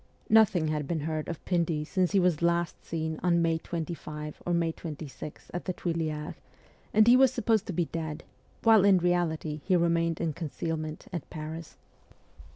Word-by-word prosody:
Nothing 200 -8 +5
had 150 -2 -2
been 165 -3 -1
heard 155 0 -3
of 170 - -6
Pindy 165 -4 0
since 185 +2 0
he 200 - +4
was 180 -3 +3
seen 170 - +2
last 170 0 0 0.5
on 175 -1 +3
May 165 -1 +1
25 155 -3 -6
or - - +1
May 170 -1 +2
26 155 -3 -8
at 175 - -4
the 185 - -1
Tuileries, 160 -3 -3 0.6
and 215 0 +5
he 240 - +8
was 260 0 +6
supposed 225 -4 +1
to 190 - -3
be 170 +1 +1
dead, 160 -1 -5 0.4
while 225 -3 +6
in 200 -2 +6
reality 165 -4 0
he 185 - +2
remained 170 -1 +2
in 165 -2 -1
con 160 0 -5
cealment 155 0 -4
at 170 - -5
Paris. 160 0 -7
170 Hz, 175 wpm, -29 LUFS, 155-180 Hz, 0.6 s, he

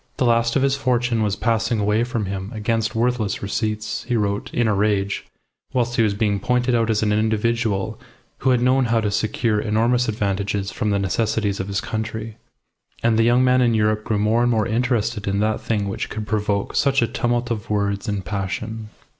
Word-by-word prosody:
The 130 - +1
last 115 0 +2
of 135 - +3
his 135 0 +2
fortune 120 -4 0
was 105 -2 +1
passing 115 0 0
away 105 +2 +2
from 120 -3 -2
him 95 0 -4
against 110 +1 -1
worthless 115 -4 0
receipts, 110 +3 -2
he 120 - -1
wrote, 100 -2 -1
in 120 -2 +1
a 110 - +2
rage, 100 -1 0 0.5
whilst 120 -1 0
he 115 - +3
was 105 -3 +2
being 105 -1 0
pointed 125 +4 +1
out 115 -1 +2
as 110 -1 +1
an 105 -1 +2
individual 110 -1 0 0.4
who 135 - +1
had 125 -1 +3
known 130 +1 +3
how 115 0 +2
to 105 -2 -1
secure 110 +1 0
enormous 115 +3 +1
advantages 100 -1 -1
from 105 - -2
the 100 - +2
necessities 100 +1 0
of 95 - -3
his 100 0 -1
country. 110 0 -4 0.7
And 115 -1 +3
the 115 - +3
young 120 +2 +4
man 130 0 +4
in 120 -2 +3
Europe 105 0 +1
grew 110 -1 -1
more 110 +3 +2
and 120 - +3
more 110 -3 +2
interested 115 -2 0
in 100 0 0
that 110 0 0
thing 105 -3 -1
which 100 - -4
could 110 0 -5
provoke 105 -1 -1
such 135 -3 +3
a - - +1
tumult 120 +1 -1
of 110 -3 -4
words 100 +1 -1
and 100 -2 -3
passion. 105 +3 -4
110 Hz, 205 wpm, -22 LUFS, 105-120 Hz, 0.7 s, young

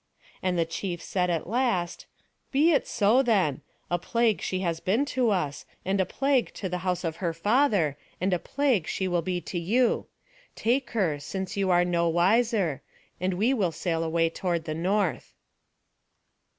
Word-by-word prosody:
And 180 -1 0
the 165 - +2
chief 175 +1 -4
said 180 0 -1
at 170 -2 -1
last, 210 -6 -1 0.4
"Be 300 +5 +4
it 290 - +2
so, 230 +4 +3
then; 190 - +1 0.3
a 175 - +1
plague 230 +3 +1
she 185 0 -2
has 170 -3 -1
been 215 +11 +1
to 255 -3 +2
us, 150 -7 -1 0.2
and 190 +1 +1
a 185 - -1
plague 270 +1 +1
to 195 - -4
the 180 0 -3
house 180 0 -1
of 165 -1 -3
her 170 -3 -1
father, 205 - +2 0.2
and 185 +1 +1
a 180 - +1
plague 260 - 0
she 190 - -1
will 175 -1 +1
be 180 +1 -2
to 175 - -4
you. 230 +9 +1 0.5
Take 245 +3 0
her, 165 -8 +1
since 190 +6 -5
you 195 -1 0
are 175 0 +4
no 170 -1 +1
wiser; 190 - +2 0.4
and 185 +1 0
we 225 +8 +2
will 195 -9 +1
sail 165 0 -2
away 165 0 +1
toward 170 -2 -2
the 155 - -3
north." 185 +2 -1
185 Hz, 175 wpm, -27 LUFS, 170-220 Hz, 0.5 s, Be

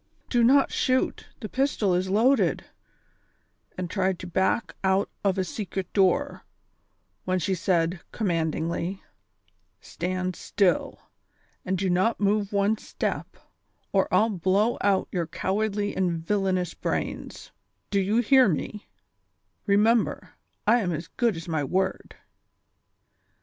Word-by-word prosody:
do 240 -2 +3
not 270 +4 +5
shoot; 255 0 0
the 215 - -4
pistol 255 -7 0
is 185 +1 0
loaded," 210 - +2 1.1
and 185 -1 -3
tried 190 0 0
to 180 - -8
back 190 +5 0
out 190 +1 +2
of 195 -1 +1
a 190 - +1
secret 190 -1 -5
door, 190 -3 +2 0.8
when 185 0 +1
she 185 +2 -1
said, 170 -1 0
commandingly: 170 -1 -2 0.4
" - - -43
Stand 185 0 -3
still, 195 -4 0 0.6
and 190 0 -1
do 190 +2 -1
not 185 +6 +1
move 205 0 +1
one 205 +1 +1
step, - - -4 0.6
or - - +3
1"11 215 -5 +2
blow 200 +6 +2
out 200 -2 +2
your 175 -3 -2
cowardly 205 +3 -1
and 170 -3 -1
villanous 190 -2 0
brains; - - -4 0.4
do 200 - +2
you 205 +5 +2
hear 260 -1 +5
me 155 - -2
V 210 -1 -10 0.8
Remember, 215 +3 +2 0.3
I 235 +4 +5
am 185 -6 -1
as 165 +1 -5
good 235 -2 0
as 165 - -8
my 160 -3 -1
word." 185 +7 -2
190 Hz, 130 wpm, -26 LUFS, 180-210 Hz, 1.1 s, not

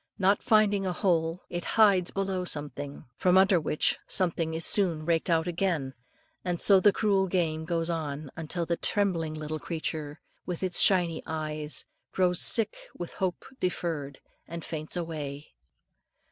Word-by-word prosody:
Not 195 0 +2
finding 210 -2 +3
a 185 -2 -1
hole, 170 -2 0
it 175 0 -4
hides 200 -5 +5
below 195 -2 -2
something, 145 -3 -4
from 180 0 +3
under 190 -1 +5
which 150 0 +1
something 165 -3 0
it - - -1
is 165 - 0
soon 170 -7 +3
raked 170 +2 0
out 165 -1 +2
again; 170 -6 -1 0.5
and 175 -2 -2
so 195 -2 +6
the 205 +2 +5
cruel 195 -2 +1
game 160 -4 -1
goes 165 -1 -1
on, 150 -4 -4 0.2
till 170 +1 0
the 170 0 -1
trembling 170 -7 +1
little 155 0 -5
creature, 155 -2 -5 0.2
with 180 0 -5
its 185 -1 +2
shiny 175 -4 +4
eyes, 155 -1 -3 0.3
grows 180 -2 +1
sick 225 -2 +3 0.2
with 175 - -6
hope 185 -2 -3
deferred, 160 -6 -3 0.3
and 170 -1 -7
faints 155 0 -4
away. 150 -4 -6
170 Hz, 155 wpm, -28 LUFS, 155-185 Hz, 0.5 s, so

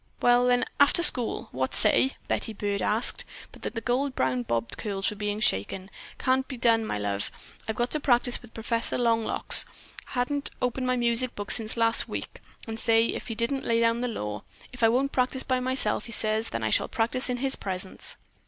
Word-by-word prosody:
"Well 245 0 +4
then, 245 0 +2
after 285 +4 +5
school. 245 -8 +1
What 130 +1 -2
say?" 265 - +3
Betty 225 - -1
Byrd 200 -1 -3
asked, 215 +6 +2 0.3
but - - -15
the 225 - -5
gold 255 +3 -1
brown 130 -1 0
bobbed 115 -1 -3
curls 195 -2 -2
were - - -7
being 210 0 -3
shaken. 185 - 0 0.3
"Can't 260 0 0
be 260 - -7
done, 225 -2 +2
my - - -2
love. 100 0 -3 0.4
I've 220 - -2
got 240 +1 -1
to 305 - +2
practice 245 -3 +2
with 240 - -15
Professor 230 +1 -2
Long 230 -2 +1
locks. - - +5 0.4
Hadn't 280 +3 -2
opened 255 +1 -2
my 255 - +1
music 240 +1 +2
book 205 0 -5
since 220 0 +2
last 230 0 +3
week, - - -6 0.3
and 225 0 -5
say, 225 0 +3
but 225 -2 -6
didn't 255 +4 0
he - - -8
lay 230 0 +2
down 230 0 +1
the 250 - -1
law! 105 - -5 0.3
If 250 - -9
I 225 - +5
won't 265 +4 +1
practice 260 +1 -1
by 255 -1 0
myself," 260 +1 +1
says 220 0 +1
he, - - -9
"then 115 - -3
I 110 - -1
shall - - +2
practice 240 +3 0
in 250 - -1
his 270 +1 -1
presence." 190 -1 -3
230 Hz, 205 wpm, -26 LUFS, 210-250 Hz, 0.4 s, after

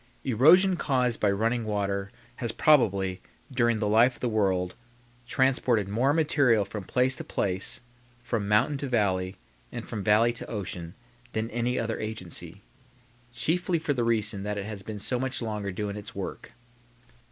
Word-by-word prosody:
Erosion 165 - +5
caused 125 -6 +1
by 105 - +3
running 115 +4 +1
water 100 -2 -2 0.3
has, 120 -2 -2
probably, 100 -10 +3 0.3
during 120 -3 +2
the 105 -1 -1
life 115 +4 +4
of - - -16
the 125 - -1
world, 95 -5 +1 0.5
transported 125 -6 +2
more 120 +7 +2
material 145 -9 +3
from 105 0 -6
place 130 +1 +1
to - - -6
place, 95 +3 -2 0.4
from 115 -4 -2
mountain 115 +8 +3
to 140 -1 -3
valley, 95 -5 +1 0.4
and - - -6
from 105 -3 -4
valley 110 +3 +4
to 120 - -7
ocean, 90 -5 -5 0.4
than 110 +1 -2
any 120 +2 -1
other 115 -1 -2
agency; 100 -3 -6 0.7
chiefly 175 +7 0
for 155 -2 -1
the 125 -3 0
reason 110 -3 0
that 105 +1 -3
it 100 - -3
has 105 -2 -6
been 105 +1 -6
so 120 +5 -2
much 130 0 -2
longer 105 -4 -3
doing 100 +2 -4
its 105 -1 -9
work. - - -6
110 Hz, 165 wpm, -27 LUFS, 100-125 Hz, 0.7 s, Erosion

